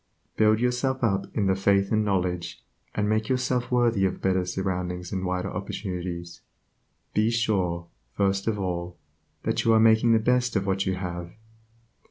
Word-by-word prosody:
Build 110 Hz, 0 st, +4 dB
yourself 125 Hz, +2 st, 0 dB
up 100 Hz, -3 st, +1 dB
in 105 Hz, -, +2 dB
the 95 Hz, -, +3 dB
faith 100 Hz, 0 st, +2 dB
and 110 Hz, -1 st, +3 dB
knowledge, 90 Hz, -3 st, -2 dB, 0.3 s
and 105 Hz, 0 st, 0 dB
make 110 Hz, +1 st, 0 dB
yourself 125 Hz, -1 st, 0 dB
worthy 120 Hz, -5 st, +2 dB
of 95 Hz, -, -2 dB
better 95 Hz, -1 st, +1 dB
surroundings 90 Hz, -1 st, -3 dB
and 95 Hz, -1 st, -2 dB
wider 90 Hz, +1 st, -2 dB
opportunities. 90 Hz, -4 st, -5 dB, 0.7 s
Be 110 Hz, +1 st, +3 dB
sure, 95 Hz, -7 st, 0 dB, 0.3 s
first 100 Hz, +2 st, 0 dB
of 110 Hz, -2 st, +1 dB
all, 90 Hz, -2 st, -3 dB, 0.5 s
that -, -, 0 dB
you 115 Hz, -, +4 dB
are 110 Hz, -, +5 dB
making 110 Hz, +1 st, +5 dB
the -, -, +6 dB
best 125 Hz, +2 st, +1 dB
of 100 Hz, -1 st, +1 dB
what 95 Hz, 0 st, 0 dB
you 95 Hz, -, +1 dB
have. 85 Hz, -2 st, -5 dB
100 Hz, 165 wpm, -26 LUFS, 90-110 Hz, 0.7 s, the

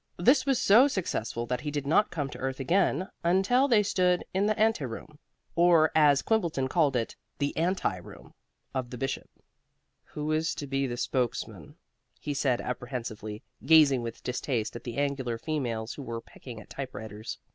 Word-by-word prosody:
This 260 Hz, +10 st, +4 dB
was 270 Hz, -3 st, +3 dB
so 230 Hz, +7 st, +6 dB
successful 120 Hz, -, -2 dB
that 125 Hz, +1 st, -2 dB
he 150 Hz, -, -3 dB
did 145 Hz, -1 st, -3 dB
not 165 Hz, +9 st, +3 dB
come 145 Hz, -5 st, -3 dB
to -, -, -8 dB
earth 130 Hz, 0 st, -3 dB
again 180 Hz, +4 st, +1 dB, 0.2 s
until 195 Hz, +10 st, +3 dB
they 225 Hz, -6 st, +4 dB
stood 180 Hz, -3 st, +1 dB
in 195 Hz, +2 st, +2 dB
the 215 Hz, -, +1 dB
ante 220 Hz, -7 st, +2 dB
room 140 Hz, +5 st, -7 dB, 0.4 s
or 170 Hz, -2 st, +5 dB
as 145 Hz, -3 st, +5 dB
Quimbleton 170 Hz, -12 st, 0 dB
called 150 Hz, -5 st, +2 dB
it, 115 Hz, -2 st, -1 dB, 0.2 s
the 145 Hz, -1 st, -1 dB
anti 175 Hz, -, 0 dB
room 90 Hz, -, -13 dB, 0.4 s
of 130 Hz, -2 st, -3 dB
the 125 Hz, -, -7 dB
Bishop. 135 Hz, +2 st, -3 dB, 0.8 s
"Who 150 Hz, +1 st, -4 dB
is 160 Hz, +1 st, 0 dB
to 145 Hz, -, -5 dB
be 135 Hz, -2 st, -1 dB
spokesman?" 125 Hz, 0 st, -3 dB, 0.4 s
he 145 Hz, -, -3 dB
said 135 Hz, -3 st, +1 dB
apprehensively, 120 Hz, -3 st, -5 dB, 0.2 s
gazing 150 Hz, -5 st, +6 dB
with 115 Hz, -1 st, -7 dB
distaste 125 Hz, -3 st, -2 dB
at 120 Hz, -, -8 dB
the 120 Hz, -2 st, -5 dB
angular 135 Hz, -4 st, -1 dB
females 120 Hz, -6 st, -3 dB
who -, -, -8 dB
were 115 Hz, -3 st, -5 dB
pecking 115 Hz, 0 st, -11 dB
at 105 Hz, -, -15 dB
typewriters. 110 Hz, -4 st, -6 dB
140 Hz, 170 wpm, -28 LUFS, 125-175 Hz, 0.8 s, so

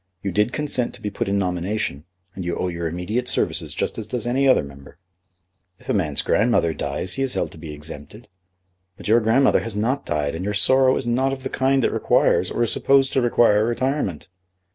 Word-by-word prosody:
"You 100 Hz, -, -2 dB
did 105 Hz, +5 st, +1 dB
consent 140 Hz, -5 st, -1 dB
to -, -, -16 dB
be 105 Hz, -, -3 dB
put 100 Hz, -, -3 dB
in 100 Hz, -, +1 dB
nomination, 90 Hz, -4 st, -2 dB, 0.3 s
and 95 Hz, -, -6 dB
you 85 Hz, 0 st, -3 dB
owe 90 Hz, -, -1 dB
your 85 Hz, -1 st, -3 dB
immediate 90 Hz, +9 st, -3 dB
services -, -, 0 dB
just -, -, -2 dB
as 110 Hz, -, -6 dB
does 120 Hz, 0 st, -4 dB
any 130 Hz, +3 st, +1 dB
other 130 Hz, -, +4 dB
member." 70 Hz, 0 st, -13 dB, 0.8 s
"If -, -, -17 dB
a -, -, +2 dB
man's 80 Hz, -8 st, 0 dB
grandmother 105 Hz, -7 st, +2 dB
dies 90 Hz, +4 st, -3 dB
he 135 Hz, -, -3 dB
is 135 Hz, -2 st, -1 dB
held -, -, -1 dB
to 80 Hz, -, -13 dB
be 80 Hz, -1 st, -8 dB
exempted." 75 Hz, +7 st, -8 dB, 0.7 s
"But -, -, -8 dB
your 115 Hz, +3 st, +5 dB
grandmother 120 Hz, +4 st, +3 dB
has 115 Hz, -3 st, -5 dB
not 125 Hz, +7 st, -1 dB
died, 75 Hz, -3 st, -1 dB
and 80 Hz, +2 st, -5 dB
your 105 Hz, +1 st, -2 dB
sorrow 130 Hz, +4 st, +4 dB
is -, -, -3 dB
not 130 Hz, +3 st, +1 dB
of 135 Hz, -1 st, -7 dB
the -, -, -3 dB
kind 135 Hz, 0 st, +1 dB
that -, -, +1 dB
requires -, -, +2 dB
or -, -, -1 dB
is 115 Hz, -, 0 dB
supposed 135 Hz, -1 st, +2 dB
to 135 Hz, -, +2 dB
require 115 Hz, -3 st, +3 dB
retirement." 120 Hz, -, -2 dB
110 Hz, 215 wpm, -22 LUFS, 90-130 Hz, 0.8 s, your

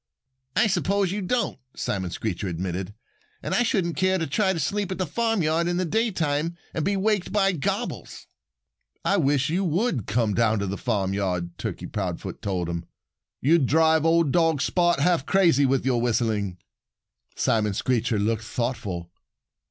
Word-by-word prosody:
"I -, -, +4 dB
suppose 195 Hz, -1 st, +1 dB
you 205 Hz, +1 st, -2 dB
don't," 235 Hz, +6 st, -1 dB, 0.2 s
Simon 95 Hz, -3 st, -2 dB
Screecher 100 Hz, +1 st, -3 dB
admitted. 90 Hz, +3 st, -4 dB, 0.5 s
"And -, -, -2 dB
I -, -, +3 dB
shouldn't 190 Hz, -8 st, 0 dB
care 185 Hz, 0 st, +2 dB
to 165 Hz, -, -1 dB
try 190 Hz, +8 st, +1 dB
to 175 Hz, -, -2 dB
sleep 200 Hz, +6 st, -1 dB
at 185 Hz, -, -3 dB
the 185 Hz, -, 0 dB
farmyard 170 Hz, -4 st, +1 dB
in 175 Hz, 0 st, 0 dB
the 185 Hz, -, 0 dB
daytime 170 Hz, -6 st, 0 dB, 0.2 s
and 160 Hz, -, -1 dB
he 200 Hz, 0 st, +1 dB
waked 205 Hz, -1 st, 0 dB
by 195 Hz, -2 st, +3 dB
gobbles." 155 Hz, -8 st, -3 dB, 0.8 s
"I 200 Hz, -, +3 dB
wish 140 Hz, -3 st, +2 dB
you 185 Hz, +4 st, +1 dB
would 175 Hz, -, 0 dB
come 110 Hz, -1 st, +1 dB
down 110 Hz, 0 st, +2 dB
to 100 Hz, -, -1 dB
the 100 Hz, +1 st, -3 dB
farmyard," 95 Hz, -6 st, -1 dB
Turkey -, -, -4 dB
Proudfoot -, -, -4 dB
told 90 Hz, -4 st, -2 dB
him. 85 Hz, 0 st, -4 dB, 0.6 s
"You'd 150 Hz, -1 st, +4 dB
drive 160 Hz, +1 st, +4 dB
old 165 Hz, -2 st, +3 dB
dog 165 Hz, -2 st, +3 dB
Spot 175 Hz, -4 st, +2 dB
half 165 Hz, -2 st, +2 dB
crazy 165 Hz, -8 st, +4 dB
with 130 Hz, -1 st, +1 dB
your 125 Hz, -3 st, +2 dB
whistling." 110 Hz, -6 st, 0 dB, 0.8 s
Simon 105 Hz, -3 st, +1 dB
Screecher 115 Hz, -2 st, 0 dB
looked 110 Hz, +2 st, 0 dB
thoughtful. 105 Hz, -7 st, -3 dB
145 Hz, 160 wpm, -25 LUFS, -, 0.8 s, I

